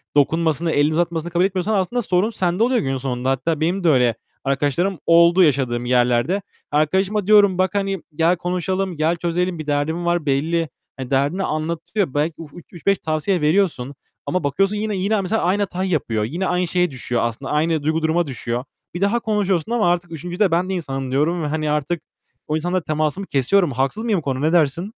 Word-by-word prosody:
dokunmasını, 160 Hz, +2 st, +2 dB
elini 150 Hz, +1 st, +2 dB
uzatmasını 170 Hz, 0 st, -1 dB
kabul 175 Hz, +2 st, +2 dB
etmiyorsan 195 Hz, +2 st, -1 dB
aslında 205 Hz, +5 st, 0 dB
sorun 190 Hz, +2 st, +1 dB
sende 185 Hz, -2 st, 0 dB
oluyor 250 Hz, 0 st, +2 dB
günün 135 Hz, -1 st, -1 dB
sonunda. 130 Hz, -1 st, -2 dB
Hatta 140 Hz, +4 st, 0 dB
benim 180 Hz, +4 st, 0 dB
de 170 Hz, -, +4 dB
öyle 125 Hz, -5 st, +3 dB, 0.3 s
arkadaşlarım 145 Hz, +7 st, 0 dB
oldu 170 Hz, +2 st, +6 dB
yaşadığım 125 Hz, -5 st, +1 dB
yerlerde. 125 Hz, +8 st, +2 dB, 0.3 s
Arkadaşıma 190 Hz, +7 st, +1 dB
diyorum; 205 Hz, -3 st, +5 dB
"Bak, 185 Hz, +2 st, 0 dB
hani, 195 Hz, -2 st, -1 dB
gel 165 Hz, +3 st, +3 dB
konuşalım, 185 Hz, +1 st, -2 dB
gel 160 Hz, +3 st, +1 dB
çözelim. 175 Hz, 0 st, -2 dB
Bir 155 Hz, -, -6 dB
derdin 155 Hz, +4 st, -1 dB
var 170 Hz, -2 st, 0 dB
belli." 160 Hz, +4 st, 0 dB, 0.3 s
Hani 130 Hz, -2 st, -6 dB
derdini 145 Hz, +8 st, +1 dB
anlatıyor, 170 Hz, +2 st, -2 dB
belki 150 Hz, +3 st, 0 dB
ü 165 Hz, -, -7 dB, 0.3 s
üç 170 Hz, -, -12 dB
beş 200 Hz, 0 st, +3 dB
tavsiye 160 Hz, +3 st, -1 dB
veriyorsun 150 Hz, -5 st, +1 dB, 0.3 s
Ama 180 Hz, -2 st, -1 dB
bakıyorsun 195 Hz, +9 st, +1 dB
yine 210 Hz, -1 st, -2 dB
yine, 200 Hz, +3 st, 0 dB
mesela 210 Hz, +4 st, -1 dB
aynı 190 Hz, +4 st, +1 dB
hatayı 185 Hz, -1 st, -2 dB
yapıyor. 115 Hz, -10 st, 0 dB
Yine 170 Hz, -, -2 dB
aynı 180 Hz, 0 st, 0 dB
şeye 180 Hz, -1 st, +1 dB
düşüyor 125 Hz, -2 st, -2 dB
aslında, 120 Hz, +3 st, -3 dB
aynı 155 Hz, 0 st, +1 dB
duygu 160 Hz, +2 st, 0 dB
duruma 160 Hz, +1 st, +1 dB
düşüyor. 120 Hz, -2 st, -3 dB, 0.3 s
Bir 175 Hz, -, -5 dB
daha 200 Hz, +4 st, +2 dB
konuşuyorsun 205 Hz, -4 st, 0 dB
ama 225 Hz, -7 st, +2 dB
artık 175 Hz, -1 st, -2 dB
3'üncüde 175 Hz, +4 st, -1 dB
"Ben 180 Hz, +3 st, +1 dB
de -, -, -1 dB
insanım." 135 Hz, -6 st, -4 dB
diyorum 155 Hz, +5 st, +1 dB
ve 150 Hz, -, -1 dB
hani 155 Hz, 0 st, -2 dB
artık 150 Hz, +3 st, -1 dB, 0.5 s
o 155 Hz, +1 st, 0 dB
insanla 175 Hz, +3 st, -1 dB
temasımı 155 Hz, +5 st, -2 dB
kesiyorum. 160 Hz, +5 st, +2 dB
Haksız 135 Hz, -, -1 dB
mıyım 225 Hz, -4 st, +1 dB
bu -, -, -7 dB
konuda? 135 Hz, 0 st, -2 dB
Ne 160 Hz, -, +1 dB
dersin? 170 Hz, +5 st, +1 dB
170 Hz, 190 wpm, -21 LUFS, 145-185 Hz, 0.5 s, oldu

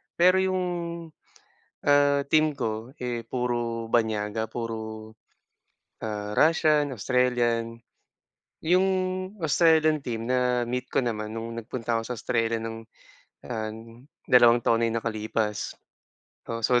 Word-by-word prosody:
Pero 185 Hz, +2 st, +5 dB
yung, 185 Hz, 0 st, +1 dB, 1.2 s
ah, 145 Hz, -1 st, +4 dB
team 155 Hz, -1 st, +2 dB
ko, 110 Hz, -1 st, -3 dB
eh, 120 Hz, -2 st, -3 dB
puro 120 Hz, -2 st, -2 dB
banyaga. 110 Hz, -1 st, 0 dB
Puro, 110 Hz, -1 st, -6 dB, 0.9 s
ah, 105 Hz, -1 st, -4 dB
Russian, 155 Hz, 0 st, +3 dB
Australian. 120 Hz, -1 st, 0 dB, 0.9 s
'Yong 180 Hz, +4 st, +4 dB, 0.6 s
Australian 155 Hz, -1 st, +4 dB
team 115 Hz, -4 st, -4 dB
na-meet 125 Hz, 0 st, 0 dB
ko -, -, -9 dB
naman 110 Hz, -3 st, -2 dB
no'ng 115 Hz, +1 st, -5 dB
nagpunta 115 Hz, 0 st, -2 dB
ako 115 Hz, -, -8 dB
sa 125 Hz, -, -3 dB
Australia 115 Hz, +1 st, 0 dB
no'ng 115 Hz, 0 st, -5 dB, 0.7 s
an 110 Hz, -, -6 dB, 0.2 s
dalawang 120 Hz, -1 st, +6 dB
taon 115 Hz, 0 st, +2 dB
na -, -, +4 dB
yung 115 Hz, -, 0 dB
nakalipas. 110 Hz, -1 st, -2 dB, 0.8 s
Oo, 115 Hz, -1 st, -4 dB
so 125 Hz, +1 st, +4 dB
115 Hz, 115 wpm, -26 LUFS, 115-130 Hz, 1.2 s, dalawang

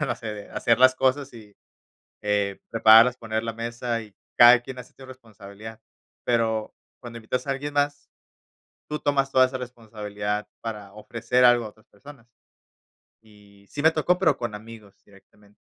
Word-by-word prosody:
no 120 Hz, -, -1 dB
sé, 115 Hz, -, -11 dB
de 105 Hz, -1 st, -11 dB
hacer 115 Hz, -1 st, +1 dB
las 130 Hz, 0 st, +6 dB
cosas, 135 Hz, +2 st, 0 dB
y, 110 Hz, -3 st, -15 dB, 0.7 s
eh, 100 Hz, -1 st, -1 dB
prepararlas. 115 Hz, +2 st, +6 dB
Poner 110 Hz, -1 st, -3 dB
la 115 Hz, 0 st, -4 dB
mesa, 115 Hz, +1 st, -4 dB
y 105 Hz, -2 st, -17 dB, 0.2 s
cada 120 Hz, +1 st, +8 dB
quien 130 Hz, +1 st, -9 dB
hacía 125 Hz, -, -11 dB
su 135 Hz, -, -13 dB
responsabilidad. 110 Hz, -3 st, -12 dB, 0.4 s
Pero, 115 Hz, -2 st, -1 dB, 0.3 s
cuando 120 Hz, -2 st, -9 dB
invitas 125 Hz, +4 st, -4 dB
a -, -, 0 dB
alguien 145 Hz, +2 st, -4 dB
más, 145 Hz, 0 st, -1 dB, 0.8 s
tú 150 Hz, 0 st, -3 dB
tomas 135 Hz, -1 st, 0 dB
toda 130 Hz, -1 st, +5 dB
esa 130 Hz, +1 st, -5 dB
responsabilidad, 105 Hz, -4 st, -6 dB
para 105 Hz, -3 st, -7 dB
ofrecer 115 Hz, +4 st, 0 dB
algo 120 Hz, -1 st, +5 dB
a 110 Hz, -, -7 dB
otras 110 Hz, +1 st, -25 dB
personas. 125 Hz, +2 st, -16 dB, 0.9 s
Y, 105 Hz, -2 st, -21 dB
sí 145 Hz, -, -6 dB
me 160 Hz, -, +6 dB
tocó, 165 Hz, +3 st, +1 dB
pero 160 Hz, -7 st, +2 dB
con 120 Hz, -3 st, -5 dB
amigos 105 Hz, -1 st, -13 dB
directamente. 100 Hz, +1 st, -23 dB
115 Hz, 165 wpm, -24 LUFS, 105-130 Hz, 0.9 s, cada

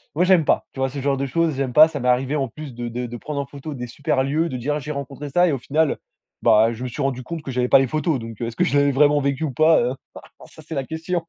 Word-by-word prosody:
moi 170 Hz, -, +3 dB
j'aime 180 Hz, -4 st, +4 dB
pas, -, -, +2 dB
tu -, -, -11 dB
vois? 135 Hz, 0 st, +1 dB
Ce 140 Hz, +1 st, -6 dB
genre 140 Hz, 0 st, 0 dB
de 140 Hz, -, -2 dB
choses 160 Hz, +4 st, 0 dB
j'aime 135 Hz, -2 st, -2 dB
pas. 155 Hz, +3 st, +8 dB
Ça 150 Hz, -3 st, -5 dB
m'est 125 Hz, -, -2 dB
arrivé 130 Hz, +4 st, +1 dB
en 135 Hz, -2 st, -1 dB
plus 145 Hz, +3 st, -9 dB
de 120 Hz, 0 st, -5 dB
de 120 Hz, +1 st, -4 dB
de 120 Hz, 0 st, -7 dB
prendre 140 Hz, +4 st, -4 dB
en -, -, -5 dB
photo 140 Hz, +3 st, -8 dB
des 125 Hz, -3 st, -6 dB
super 130 Hz, +1 st, -1 dB
lieux, 155 Hz, +5 st, 0 dB
de 130 Hz, -, -5 dB
dire: 145 Hz, +5 st, -2 dB
«Ah, -, -, -2 dB
j'ai 150 Hz, +1 st, -6 dB
rencontré 140 Hz, 0 st, -6 dB
ça.» 175 Hz, +5 st, +3 dB
et -, -, +1 dB
au 140 Hz, -, -1 dB
final, 150 Hz, +4 st, 0 dB, 0.4 s
bah, 110 Hz, +2 st, +5 dB
je 120 Hz, +2 st, -7 dB
me -, -, -2 dB
suis 125 Hz, +4 st, -6 dB
rendu 130 Hz, -2 st, -2 dB
compte 165 Hz, +4 st, -6 dB
que 135 Hz, -, -5 dB
j'avais 125 Hz, 0 st, 0 dB
pas -, -, +6 dB
les 135 Hz, -, +1 dB
photos, 155 Hz, +1 st, -1 dB
donc, 115 Hz, -2 st, -9 dB
heu, 115 Hz, -, -1 dB
est-ce 115 Hz, -, -7 dB
que -, -, +1 dB
je 140 Hz, -, +1 dB
l'avais 140 Hz, 0 st, +3 dB
vraiment 145 Hz, +2 st, +4 dB
vécu 140 Hz, +1 st, -1 dB
ou 155 Hz, -, -1 dB
pas? 155 Hz, +6 st, +4 dB
Heu, 125 Hz, +2 st, -1 dB, 0.5 s
ça -, -, -15 dB
c'est 160 Hz, -, -6 dB
la 135 Hz, -1 st, -2 dB
question. 165 Hz, +3 st, -3 dB
140 Hz, 320 wpm, -22 LUFS, 125-155 Hz, 0.5 s, pas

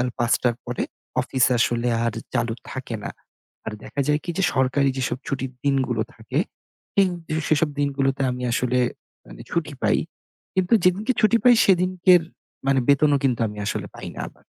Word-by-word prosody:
আর 125 Hz, -, +1 dB
০৫ঃ০০ 120 Hz, +1 st, +2 dB
র -, -, -23 dB
পরে 120 Hz, 0 st, -2 dB, 0.4 s
অফিস 130 Hz, 0 st, +1 dB
আসলে 120 Hz, +1 st, +1 dB, 0.2 s
আর 115 Hz, -, 0 dB, 0.2 s
চালু 120 Hz, -2 st, 0 dB, 0.2 s
থাকে 130 Hz, -3 st, -5 dB
না। -, -, -4 dB, 0.6 s
আর 110 Hz, -, -3 dB
দেখা 140 Hz, -, -4 dB
যায় 150 Hz, 0 st, +2 dB
কি? 175 Hz, -, -3 dB
যে -, -, +2 dB
সরকারি 130 Hz, +1 st, +2 dB
যেসব 130 Hz, -1 st, -1 dB
ছুটির 135 Hz, -1 st, -3 dB
দিনগুলো 130 Hz, -5 st, +1 dB
থাকে, 115 Hz, +5 st, -4 dB, 0.6 s
পিং 195 Hz, -1 st, +4 dB, 0.4 s
সেসব 155 Hz, 0 st, +3 dB
দিনগুলোতে 135 Hz, -1 st, 0 dB
আমি 125 Hz, 0 st, -5 dB
আসলে 125 Hz, 0 st, +1 dB, 0.5 s
মানে -, -, -12 dB
ছুটি 155 Hz, -3 st, -1 dB
পাই। -, -, +3 dB, 0.6 s
কিন্তু 185 Hz, +1 st, 0 dB
যেদিনকে 200 Hz, +8 st, +3 dB
ছুটি 215 Hz, +2 st, +5 dB
পাই 250 Hz, -1 st, +8 dB
সেদিনকের 185 Hz, -1 st, +4 dB, 0.4 s
মানে 135 Hz, 0 st, +3 dB
বেতনও 145 Hz, 0 st, +4 dB
কিন্তু 125 Hz, -3 st, +1 dB
আমি 105 Hz, 0 st, -9 dB
আসলে 105 Hz, -, -2 dB
পাই -, -, -7 dB
না -, -, -5 dB
আবার। -, -, -24 dB
135 Hz, 170 wpm, -23 LUFS, 125-165 Hz, 0.6 s, পাই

